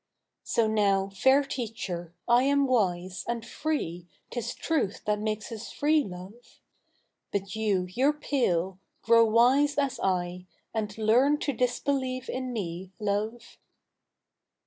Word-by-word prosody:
So 230 - +1
now, 200 -3 +2
fair 265 +8 +4
teacher, 215 -10 -5 0.2
I 240 0 +5
am 280 0 +3
wise. 185 -7 0
And 235 -1 -2
free: 235 - -3 0.3
Uis 240 0 -3
truth 300 - -1
that 210 0 +1
makes 215 +1 -3
us 225 0 -7
free, 300 +1 +2
loi'e. 190 +4 -9 0.9
But 195 0 -3
you— 205 -4 +1
you'' 255 +10 +2
re - - -20
pale 190 - 0
I - - -40
grow 230 0 +6
wise 255 +6 +4
as 275 -2 0
/, - - -4 0.7
And 210 -2 -3
learn 245 +7 +4
to 285 - 0
disbelieve 255 +1 -1
in 255 0 -3
me, 185 -4 -5
love. 215 +3 -3
225 Hz, 135 wpm, -28 LUFS, 195-260 Hz, 0.9 s, grow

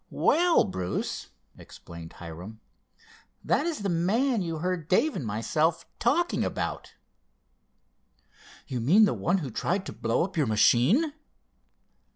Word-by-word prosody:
"Well, 345 -2 +3
Bruce," 95 - -4 0.3
explained 85 -1 -11
Hiram, 90 +6 -10 0.8
"that 300 - +1
is 310 -11 -3
the 200 - 0
man 215 +8 +1
you 165 -2 -3
heard 175 -1 -3
Dave 295 - +2
and - - -3
myself 150 +10 0
talking 335 +9 +1
about." - - -4 1.7
"You 130 -3 -4
mean 185 - +6
the - - +1
one 180 +3 0
who 145 -9 -5
tried 190 - -1
to - - -6
blow 115 +6 0
up 185 +1 -5
your 150 -5 +2
machine?" 130 - +3
170 Hz, 130 wpm, -27 LUFS, -, 1.7 s, mean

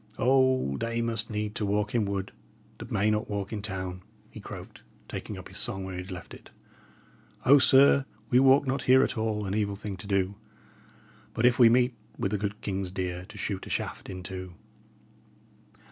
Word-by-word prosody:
"'O, 130 - +3
they 115 0 -2
must 115 -1 0
need 105 -1 -3
to 110 - -2
walk 105 +1 0
in 115 -3 +2
wood 100 -1 -3 0.5
that - - -9
may 105 +2 +2
not 105 0 -1
walk 100 0 -3
in 105 - -3
town,'" 95 -3 -4 0.3
he - - -10
croaked, - - -10 0.3
taking - - -6
up - - -9
his - - -3
song 95 0 -2
where 95 0 -6
he 90 - -4
had 90 - -11
left 90 -2 -8
it. - - -13 1.0
"O, 140 +2 +8
sir, 135 +1 +6 0.3
we 125 - +6
walk 135 +2 +5
not 130 0 -1
here 130 +1 +7
at - - -1
all 110 -2 -1
an 95 - -3
evil 100 -1 0
thing 100 -1 -6
to 95 - -9
do. 100 -1 +1 1.0
But 110 - +1
if 125 0 +4
we 120 -2 +8
meet 125 +1 +3 0.2
with 95 - -1
the 105 - -1
good 100 +1 -3
king's 95 -1 -3
deer 90 -1 -4
to 105 +2 -13
shoot 95 -1 -4
a - - -8
shaft - - -4
into." 95 -1 -7
105 Hz, 195 wpm, -28 LUFS, 95-120 Hz, 1.0 s, O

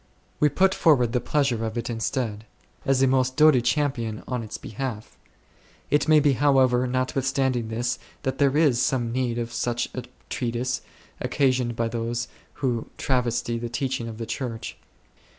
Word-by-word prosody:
We 150 - +5
put 190 +5 +3
forward 130 -11 +4
the 125 0 0
pleasure 135 -6 +1
of 110 +1 -3
it 120 - -2
instead, 115 -2 -2 0.4
as 135 -1 +3
a - - +5
most 130 0 +2
doughty 155 -5 +6
champion 125 -4 -1
on 125 -2 -2
its 110 - -6
be - - -10
half. 115 -2 -5 0.8
It 145 - +3
may 155 -1 +7
be 145 -1 +3
however, 130 -2 +3
notwithstanding 130 -1 0
this, 120 +2 -2 0.2
that 130 -1 -2
there 140 0 +3
is 140 -6 +4
some 120 -3 +1
need 120 -1 -1
of 120 0 -3
such 120 0 -1
a 125 -2 -5 0.2
treatise, 125 +1 -2 0.4
occa 140 -2 +2
sioned 125 -2 -1
by 115 0 0
those 115 +1 -2 0.4
who 120 -3 -1
travesty 120 -3 0
the 120 0 -4
teaching 120 -1 -2
of 110 -1 -7
the 115 - -4
Church. 115 -1 -4
125 Hz, 170 wpm, -25 LUFS, 115-135 Hz, 0.8 s, may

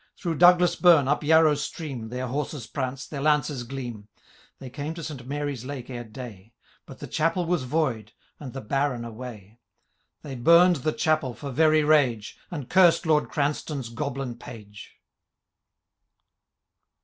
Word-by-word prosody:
Through 165 -4 -3
Douglas 180 0 +6
bum, 165 -5 +5
up 140 - +1
Yarrow 160 0 +5
stream,* 145 -5 -5
ITieir 125 +2 -4
horses 140 -1 -4
prance, 130 +1 -4
their 140 -3 -6
lances 150 -2 +1
gleam. 120 -5 -7 0.5
They 130 -2 -10
came 150 +4 -5
to 165 - -7
St. 135 -6 -7
Mary's 145 -3 -4
lake 130 -1 -7
ere 120 -1 -5
day; 110 -2 -11 0.3
But - - -11
the - - -8
chapel 165 +3 0
was 170 -6 -1
void, 125 -7 -1 0.3
and 135 -4 -8
the 135 - -7
Baron 130 0 -1
away. 115 -2 -10 0.6
They 140 - -7
bum'd 170 +7 +5
the 145 +3 -1
chapel 155 -6 0
for 140 +4 -7
v^y 155 +1 +3
rage. 125 -9 +2
And 145 -7 -6
cursed 180 -2 +4
Lord 155 -2 +2
Oranstoun^ 140 -4 -2
Goblin 135 -2 -4
Page. 105 -5 -12
140 Hz, 150 wpm, -25 LUFS, 120-155 Hz, 0.6 s, Douglas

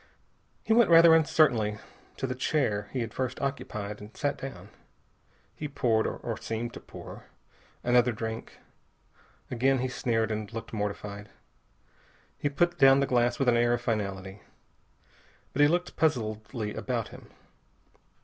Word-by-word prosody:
He 220 - +2
went 235 -4 +5
rather 165 0 +8
uncertainly 130 -10 +3 0.4
to - - -2
the 130 - -2
chair 125 -6 0
he 130 - -2
had 115 0 -4
first 130 -1 -3
occupied 105 -7 -4
and 105 +2 -12
sat 145 0 0
down. 100 -8 -8 0.9
He 150 - -4
poured 120 -6 +1
or - - -4
seemed 115 +1 -4
to - - -8
pour - - -11 0.6
another 125 0 +4
drink. 110 0 -6 0.9
Again 130 +2 +2
he 130 +1 -1
sneered, 115 -3 -1
and 110 -1 -4
looked 115 0 -7
mortified. 105 -1 -4 1.1
He 145 - -1
put 175 +5 0
down 135 0 +7
the 140 - +2
glass 120 -2 +2
with 135 - 0
an 120 - +5
air 120 0 +3
of 120 - -6
finality. 100 -4 -3 1.1
But 145 - +1
he 145 - +7
looked 175 +3 -1
puzzledly 110 -5 -1
about 120 -4 -2
him. - - -13
120 Hz, 145 wpm, -28 LUFS, 110-135 Hz, 1.1 s, rather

